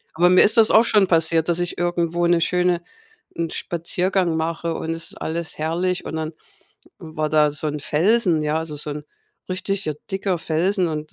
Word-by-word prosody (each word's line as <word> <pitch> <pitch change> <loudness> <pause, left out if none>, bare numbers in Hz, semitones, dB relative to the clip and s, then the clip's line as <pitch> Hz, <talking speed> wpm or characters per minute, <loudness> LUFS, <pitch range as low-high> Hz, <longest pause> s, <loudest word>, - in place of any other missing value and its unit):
Aber 175 +2 +4
mir 185 - +7
ist 215 +3 +4
das 225 -1 +5
auch 220 - +6
schon 210 -4 +3
passiert, 165 -2 +2
dass 175 0 +1
ich 175 0 -2
irgendwo 175 0 -1
'ne 170 0 +3
schöne 180 0 +1 0.5
'n 165 -1 -2
Spaziergang 175 +1 -1
mache 165 +1 -2
und 160 - -4
es 165 0 -4
ist - - -10
alles 165 0 -3
herrlich 175 +4 -1
und 160 - -5
dann, 160 0 -4 0.7
hm, 160 0 -11
war 155 -1 -1
da 150 -1 +4
so 150 +1 -3
'n 150 0 -4
Felsen, 175 +2 +2
ja, 150 +1 0
also, 160 -2 -5
so 150 +1 -3
'n 150 0 -6 0.5
richtiger 185 -3 -2 0.2
dicker 190 -1 -1
Felsen. 175 +3 0
Und, 155 -1 -5
170 Hz, 195 wpm, -21 LUFS, 160-180 Hz, 0.7 s, mir